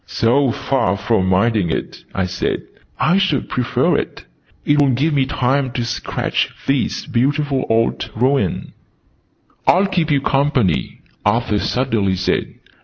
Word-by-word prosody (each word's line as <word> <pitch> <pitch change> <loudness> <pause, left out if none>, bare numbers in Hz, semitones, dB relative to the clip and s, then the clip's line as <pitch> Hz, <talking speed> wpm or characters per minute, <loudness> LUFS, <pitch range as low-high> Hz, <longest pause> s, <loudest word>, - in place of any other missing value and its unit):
"So 125 +7 +2
far 105 -7 0
from 100 -2 +1
minding 100 0 +2
it," 80 - -4
I 95 - 0
said, 95 +1 -2 0.4
"I 175 +5 +3
should 185 -8 0
prefer 125 -1 +1
it. - - -5 0.4
It 145 0 +3
will 140 - +4
give 140 +6 +1
me 135 -2 +2
time 130 0 0
to 120 -2 -2
sketch 120 +1 -2 0.2
this 135 -2 0
beautiful 140 0 0
old 115 0 +1
ruin." 130 +5 0 0.9
"I'll 190 +3 +5
keep 180 -5 0
you 145 -2 +3
company," 135 - 0 0.2
Arthur 105 0 +1
suddenly 110 -8 0
said. 90 0 -1
125 Hz, 135 wpm, -19 LUFS, 110-140 Hz, 0.9 s, I'll